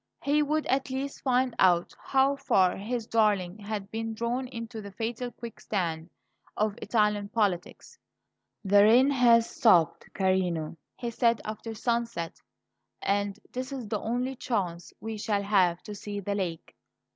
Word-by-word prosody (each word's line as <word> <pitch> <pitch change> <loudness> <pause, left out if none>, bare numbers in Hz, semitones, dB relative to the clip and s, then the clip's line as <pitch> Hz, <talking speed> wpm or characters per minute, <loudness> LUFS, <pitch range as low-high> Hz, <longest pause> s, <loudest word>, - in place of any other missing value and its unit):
He 290 +2 +3
would 305 +1 0
at 265 0 0
least 270 +2 -4
find 255 -1 +2
out 175 -2 +4
how 270 +1 +2
far 190 -10 +2
his 225 +3 -3
darling 210 -4 +1
had 205 -1 -5
been 225 0 -3
drawn 240 +3 -2
into 230 -2 -7
the 200 - -8
fatal 230 +4 -3
quicksand 180 -8 -4 0.5
of 215 -1 +1
Italian 210 -2 +1
politics. 200 -5 -2 0.7
"The 200 +1 +6
rain 245 +6 +6
has 235 -3 +5
stopped, 175 -9 +3
carino," 180 -5 0 0.2
he 240 -1 -4
said 230 0 +2
after 220 +1 -6
sunset; 235 -7 -2 0.6
"and 200 0 0
this 255 +2 -4
is 260 -5 -5
the 215 - -1
only 250 +3 -2
chance 180 -9 -3
we 220 -1 -5
shall 205 -1 0
have 185 -4 +2
to 210 - -7
see 205 0 -6
the 200 +1 -3
lake. 180 -5 -4
220 Hz, 145 wpm, -28 LUFS, 195-245 Hz, 0.7 s, The